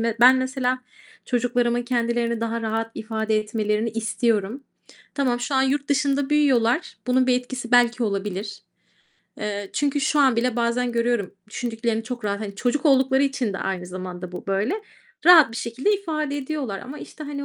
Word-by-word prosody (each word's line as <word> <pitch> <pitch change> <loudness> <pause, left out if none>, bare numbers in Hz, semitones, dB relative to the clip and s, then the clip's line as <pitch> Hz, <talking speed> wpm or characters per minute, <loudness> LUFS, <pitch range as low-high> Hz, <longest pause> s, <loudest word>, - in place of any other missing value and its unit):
me 230 0 0
ben 255 +2 +8
mesela 260 -1 -1 0.5
çocuklarımın 245 -1 +1
kendilerini 235 -1 0
daha 230 0 -2
rahat 225 +1 -2
ifade 220 0 -1
etmelerini 215 +1 -1
istiyorum. 225 +2 -1 0.5
Tamam, 250 -4 0
şu 270 +3 -2
an 265 - +4
yurt 280 +1 0
dışında 285 -1 +1
büyüyorlar, 275 -2 +2
bunun 255 0 +3
bir 250 - +4
etkisi 250 -1 -7
belki 245 0 +4
olabilir. 200 -1 -3 0.8
Eee, 205 -2 -4
çünkü 290 0 0
şu 295 +2 +1
an 265 -4 +4
bile 245 0 0
bazen 240 +1 0
görüyorum, 235 -5 0 0.2
düşündüklerini 225 -1 -2
çok 245 -2 -6
rahat, 200 0 -1
hani, 200 -2 -5
çocuk 260 +8 0
oldukları 265 -1 +4
için 270 -6 0
de 195 - -4
aynı 185 -2 -3
zamanda 180 0 -7
bu 180 - -8
böyle, 195 - 0 0.5
rahat 325 -9 +8
bir 230 - -6
şekilde 250 - 0
ifade 305 -7 -3
ediyorlar 275 -7 -3
ama, 285 +4 -8
işte, 310 - -9
hani, 285 -1 -5
240 Hz, 165 wpm, -23 LUFS, 220-265 Hz, 0.8 s, ben